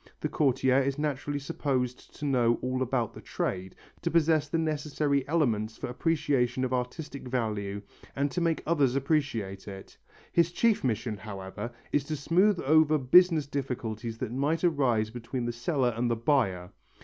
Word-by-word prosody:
The - - -1
courtier 130 -2 +2
is 135 +1 -1
naturally 145 -1 -2
supposed 130 -3 -3
to 150 - -6
know 120 -4 +3
all 130 0 -1
about 120 -3 0
the - - -10
trade, 95 0 -3 0.3
to - - 0
possess 160 -2 +3
the 165 - 0
necessary 150 -3 0
elements 115 -9 0
for 130 - -5
appreciation 130 -4 +1
of 130 - -2
artistic 130 +2 -4
value 105 -5 -2 0.3
and 140 +1 0
to 180 - -2
make 165 -1 0
others 145 -6 +2
appreciate 130 -10 -1
it. 95 -1 -9 0.4
His 170 0 +3
chief 225 +4 +2
mission, 115 -3 -1
however, 100 +2 -7 0.2
is 145 - +2
to 155 - -3
smooth 175 +7 +3
over 155 +1 +5
business 160 +3 +5
difficulties 120 -5 -4
that 120 -1 -4
might 145 +6 0
arise 125 -10 +2
between 120 +1 -4
the 120 - -2
seller 120 +1 0
and 120 +1 0
the 115 - +1
buyer. 115 -8 +1
130 Hz, 160 wpm, -28 LUFS, 115-150 Hz, 0.4 s, over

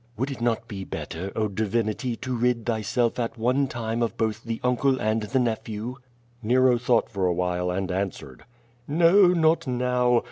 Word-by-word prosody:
"Would 130 +5 -1
it 130 - -7
not 120 -1 0
be 95 -2 -6
better, 95 +1 -6
oh, 110 -1 +1
Divinity, 110 +3 -1
to 130 +2 -4
rid 120 -1 0
thyself 115 +1 0
at 120 +1 -2
one 130 +5 +1
time 115 -2 -3
of 115 - -1
both 110 0 -1
the 115 -1 -4
uncle 130 +2 +2
and 110 +1 0
the 110 +5 -2
nephew?" 115 0 -2 0.4
Nero 125 +2 +3
thought 120 -1 +2
for 95 -3 0
a 90 - +2
while 90 0 -1
and 95 +1 -2
answered. 90 -9 -4 0.4
"No, 170 +6 +5
not 165 -3 +3
now. 125 -1 +2
115 Hz, 175 wpm, -25 LUFS, 105-125 Hz, 0.4 s, No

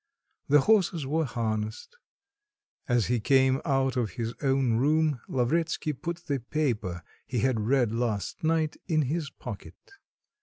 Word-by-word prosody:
The 145 0 +6
horses 185 -6 +2
were 160 +4 0
harnessed. 110 - -3 0.9
As 120 -4 +2
he 120 0 +1
came 130 +2 +3
out 135 -3 +1
of 115 -7 -1
his 115 +2 -3
own 135 -4 +2
room, 150 0 +2
Lavretsky 155 +4 0
put 170 +4 -6
the 140 -3 -1
paper 115 - -2 0.2
he 120 -1 -1
had 130 -2 +1
read 120 +1 +2
last 115 - -2
night 160 -1 +1
in 155 -2 +2
his 150 +2 -2
pocket. - - -9
135 Hz, 140 wpm, -28 LUFS, 115-155 Hz, 0.9 s, The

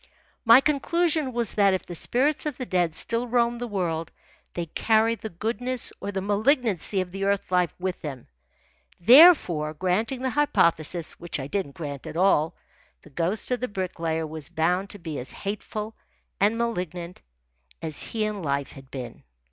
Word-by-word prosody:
My 230 +3 +8
conclusion 305 0 +1
was 235 -3 0
that 200 -2 +4
if 185 - -5
the 175 - -8
spirits 270 - +1
of 295 - -4
the 255 - -4
dead 175 -6 0
still 230 +1 0
roamed 240 0 +1
the 245 - -2
world 170 -6 -2 0.4
they 175 - -2
carried 225 +6 +1
the 220 - -6
goodness 235 +7 -3
or 200 - -3
the 195 -1 -3
malignancy 210 - +2
of 180 -1 -6
the 195 +1 -4
earth 200 -1 0
life 180 -3 +2
with 185 0 -4
them. 135 -6 -7 0.7
Therefore, 185 - +6
granting 215 - -1
the 260 - 0
hypothesis 170 - +1
(which 170 -3 -4
I 135 - -4
didn't 145 -2 -3
grant 145 -4 -6
at - - -6
all), 170 -3 +3 0.5
the - - -16
ghost 175 - 0
of 250 - +1
the 250 - -2
Bricklayer 165 -5 -3
was 155 -1 -3
bound 175 +3 0
to 205 - -7
be 165 -5 -6
as 125 - -5
hateful 215 +2 -5 0.4
and 210 +3 +3
malignant 180 -6 -3 0.6
as 155 -2 -1
he 220 -2 -2
in 210 -2 -3
life 140 -3 -2
had 135 -1 -14
been. 125 -4 -7
195 Hz, 170 wpm, -25 LUFS, 165-235 Hz, 0.7 s, My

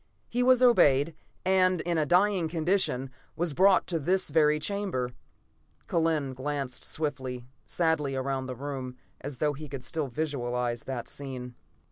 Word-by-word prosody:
He 245 - -1
was 255 0 +5
obeyed, 145 - +5 0.3
and, 185 -1 +3
in 170 -2 0
a 150 - +1
dying 185 0 +3
condition, 160 -5 0 0.2
was 170 -2 -1
brought 190 +4 +5
to 170 -3 -2
this 180 +2 +1
very 150 0 +4
chamber." 185 -10 -2 0.8
Kellen 160 -5 +1
glanced 135 -1 -3
swiftly, 130 -5 -3 0.2
sadly, 160 -5 0
around 130 0 -2
the 130 - -5
room, 130 -1 -5 0.2
as 140 -1 -6
though 150 +1 +1
he 150 +1 -9
could 135 -2 -6
still 155 0 -2
visualize 125 -4 -2
that 130 -3 -4
scene. 130 -3 -7
145 Hz, 145 wpm, -28 LUFS, 130-175 Hz, 0.8 s, was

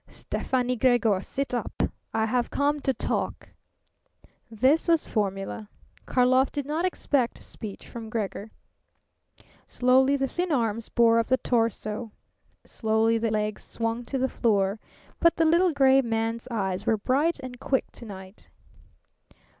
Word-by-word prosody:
"Stefani 250 -1 -2
Gregor, 230 -5 +3
sit 275 +5 -4
up. 245 - -2 0.3
I 220 - +1
have 240 +2 0
come 290 +1 +1
to 275 - 0
talk." - - -3 1.0
This 260 +10 +2
was 330 -2 +3
formula. 200 0 -3 0.4
Karlov 255 +1 +3
did 285 -2 -3
not 310 +5 -1
expect 280 -8 -1
speech 210 -4 -8
from 225 -2 -8
Gregor. 215 -1 -4 1.2
Slowly 260 +2 +3
the 270 0 0
thin 350 +6 -2
arms 230 -5 0
bore 230 -1 +4
up 230 - 0
the 260 - +3
torso; 225 -2 -1 0.5
slowly 225 0 +1
the 225 0 0
legs 215 0 -2
swung 230 +1 -3
to 270 - -3
the 260 0 +1
floor. 205 -4 +1 0.4
But 335 -1 +4
the 325 - +2
little 340 +3 +4
gray 270 -2 +5
man's 230 0 -2
eyes 195 -5 -2
were 220 - +3
bright 280 +10 +1
and 255 -2 -8
quick 265 -1 -1
to 235 - -11
night. 190 -1 -11
240 Hz, 140 wpm, -26 LUFS, 220-270 Hz, 1.2 s, gray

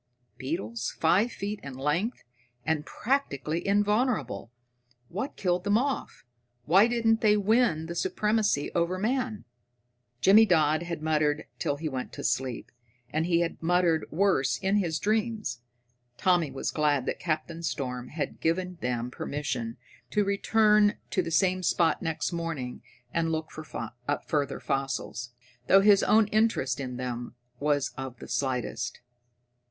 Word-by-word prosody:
Beetles 115 -2 -3
five 190 +9 +3
feet 205 0 -4
in 140 -2 -8
length, 150 - -1 0.4
and 160 -1 0
practically 170 - -1
invulnerable! 205 - +1 0.6
What 215 - -4
killed 180 -1 0
them 205 +1 +3
off? 270 +2 -2 0.4
Why 195 +7 +6
didn't 230 -2 +2
they 210 -2 +5
win 205 -6 +2
the 170 - -5
supremacy 210 - +1
over 170 +2 +1
man?" 230 +1 -1 0.7
Jimmy 205 - +7
Dodd 155 -3 +3
had 170 -2 -5
muttered 155 -1 +1
till 145 - 0
he 155 +2 -4
went 130 -3 -4
to - - -7
sleep, 130 -3 -2 0.4
and 160 +2 +1
he 170 -1 +3
had 170 - -3
muttered 170 -1 +2
worse 145 -9 +2
in 195 +6 +1
his 170 -5 0
dreams. 215 - -1 0.6
Tommy 175 -5 +2
was 135 - -3
glad 145 -4 +1
that - - -2
Captain 165 0 -2
Storm 125 -6 -3
had 150 +1 -5
given 180 +2 -1
them 125 -1 -2
permission 130 -6 -3 0.3
to 210 - +2
return 210 +1 +4 0.2
to 185 - +2
the 165 - -4
same 185 +2 +2
spot 165 -2 +2
next 165 +1 -2
morning 165 -7 -4 0.3
and 165 -1 +1
look 160 -1 -3
for 155 -7 -6 0.4
further 145 -3 -1
fossils, 135 -3 -3 0.4
though 195 - +7
his 200 0 +6
own 220 0 +5
interest 215 - +1
in 125 -2 -4
them 120 -1 -5 0.2
was 145 -1 +1
of 130 -2 -6
the - - -10
slightest. 125 -2 -2
165 Hz, 140 wpm, -28 LUFS, 140-205 Hz, 0.7 s, Jimmy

